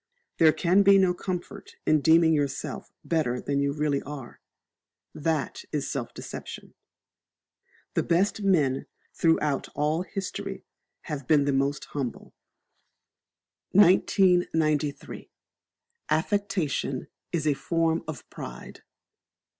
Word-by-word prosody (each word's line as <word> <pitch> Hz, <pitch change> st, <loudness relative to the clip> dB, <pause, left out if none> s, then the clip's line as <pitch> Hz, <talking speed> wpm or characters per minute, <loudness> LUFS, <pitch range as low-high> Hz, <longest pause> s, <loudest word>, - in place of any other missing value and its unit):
There 160 Hz, -1 st, +7 dB
can 180 Hz, +4 st, +3 dB
be 200 Hz, 0 st, +7 dB
no 185 Hz, -2 st, +4 dB
comfort 180 Hz, -1 st, -6 dB
in 155 Hz, -1 st, +3 dB
deeming 160 Hz, +1 st, +5 dB
yourself 145 Hz, -2 st, -2 dB
better 140 Hz, -7 st, 0 dB
than 140 Hz, +2 st, -1 dB
you 140 Hz, 0 st, +1 dB
really 145 Hz, -1 st, 0 dB
are: 140 Hz, -4 st, -9 dB, 0.7 s
that 155 Hz, -4 st, -2 dB
is 145 Hz, -2 st, -2 dB
self 130 Hz, -5 st, -4 dB
deception. -, -, -8 dB, 1.2 s
The -, -, +2 dB
best 195 Hz, +5 st, +1 dB
men 150 Hz, -9 st, +2 dB, 0.3 s
throughout 155 Hz, -4 st, +1 dB
all 150 Hz, +3 st, +1 dB
history 195 Hz, +2 st, -5 dB, 0.4 s
have 145 Hz, -5 st, -6 dB
been 150 Hz, -3 st, +4 dB
the 140 Hz, -, +1 dB
most 140 Hz, +1 st, 0 dB
humble. 135 Hz, -5 st, -5 dB, 1.4 s
1993. 175 Hz, -6 st, +3 dB, 0.8 s
Affectation 160 Hz, -5 st, -1 dB, 0.3 s
is 165 Hz, -3 st, -1 dB
a 150 Hz, -, +3 dB
Form 165 Hz, +2 st, 0 dB
of 155 Hz, -6 st, -7 dB
Pride. 60 Hz, 0 st, -9 dB
155 Hz, 105 wpm, -27 LUFS, 140-175 Hz, 1.4 s, There